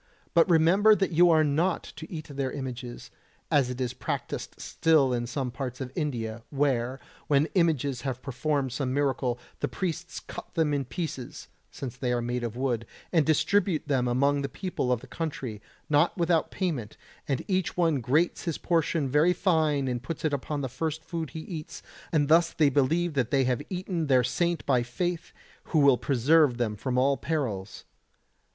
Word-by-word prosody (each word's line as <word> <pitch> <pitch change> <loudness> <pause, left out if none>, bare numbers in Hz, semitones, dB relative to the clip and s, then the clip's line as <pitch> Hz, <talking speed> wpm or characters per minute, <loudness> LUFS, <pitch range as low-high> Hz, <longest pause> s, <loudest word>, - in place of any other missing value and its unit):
but 170 +2 +5
remember 180 +6 +5
that 195 -2 0
you 175 +2 +5
are 160 -2 +5
not 160 +5 +1
to 160 - -10
eat 155 -3 -5
their 135 -2 -2
images, 125 -3 -6 0.4
as 140 -4 +3
is 125 -1 -2
practised 125 - -4
still 155 -6 +2
in 120 -1 -1
some 125 0 -3
parts 125 0 -5
of 130 -2 -5
India, 120 -8 -3
where, 135 -3 0 0.3
when 145 0 +4
images 145 -8 +1
have 130 -2 -3
performed 140 0 -1
some 130 +1 -2
miracle, 135 -3 0 0.2
the - - 0
priests 175 -2 -4
cut - - -10
them 160 -3 +2
in 140 -2 0
pieces 135 0 -6 0.2
(since 130 -3 -7
they 125 -2 -1
are 120 - +2 0.3
of 115 -1 -3
wood) 120 -3 -1 0.3
and 160 -3 +3
distribute 160 +2 +2
them 130 -4 +1
among 140 +4 +2
the 140 - -3
people 175 -9 -2
of 120 -2 +1
the - - -11
country, 130 -6 -5 0.3
not 150 +5 +3
without 170 -2 +2
payment, 145 - -3 0.3
and 135 -3 -1
each 185 -3 -1
one 165 -6 +2
grates 150 +11 +1
his 165 -3 -1
portion 165 -3 +1
very 150 +6 +4
fine 155 -7 +1
and 125 -2 -2
puts 155 +5 -5
it 155 - +1
upon 145 +1 -2
the 135 - -2
first 160 +5 -4
food 165 -4 -4
he 160 - -7
eats; 155 -3 -7 0.3
and 150 -3 +2
thus 165 +2 +4
they 150 -3 +4
believe 155 +5 +1
that 130 -5 0
they 135 0 +3
have 125 -2 0
eaten 180 -3 -2
their 130 -2 +4
saint 170 +6 0
by 130 -3 +3
faith, 170 +8 -3 0.3
who - - -1
will 140 -3 +6
preserve 140 +1 +3
them 115 -4 -1
from 125 +4 -2
all 135 +2 +3
perils. 120 -12 -3
145 Hz, 180 wpm, -27 LUFS, 125-165 Hz, 0.4 s, will